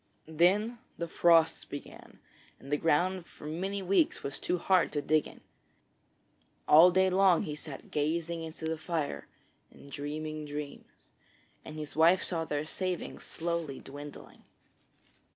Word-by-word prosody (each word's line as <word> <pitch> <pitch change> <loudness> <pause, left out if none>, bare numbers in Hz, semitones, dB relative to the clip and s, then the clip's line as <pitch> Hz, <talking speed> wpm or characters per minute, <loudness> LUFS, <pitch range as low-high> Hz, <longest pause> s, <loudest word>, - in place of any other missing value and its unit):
Then 195 +9 +2 0.2
the 170 - -3
frosts 165 -1 +4
began 145 - -10 0.4
and 135 - -11
the 145 - +3
ground 175 +4 +1
for - - -14
many 190 +6 -3
weeks 195 - +2
was 140 - -4
too 180 - -1
hard 185 0 +2
to 145 - 0
dig. 155 -1 0 1.3
All 165 +4 +9
day 190 +1 +3
long 185 -2 +4
he 150 - -4
sat 150 -2 -9
gazing 165 +3 -1
into 160 0 -7
the 160 0 -2
fire 160 -3 -3 0.4
and 140 - -16
dreaming 155 +1 -5
dreams, 145 0 -8 0.5
and 155 - -9
his 150 -1 -7
wife 165 +4 +5
saw 165 -2 -2
their 150 -1 -2
savings 185 +2 -4
slowly 165 -4 -3
dwindling. 145 +1 -11
160 Hz, 135 wpm, -30 LUFS, 150-180 Hz, 1.3 s, All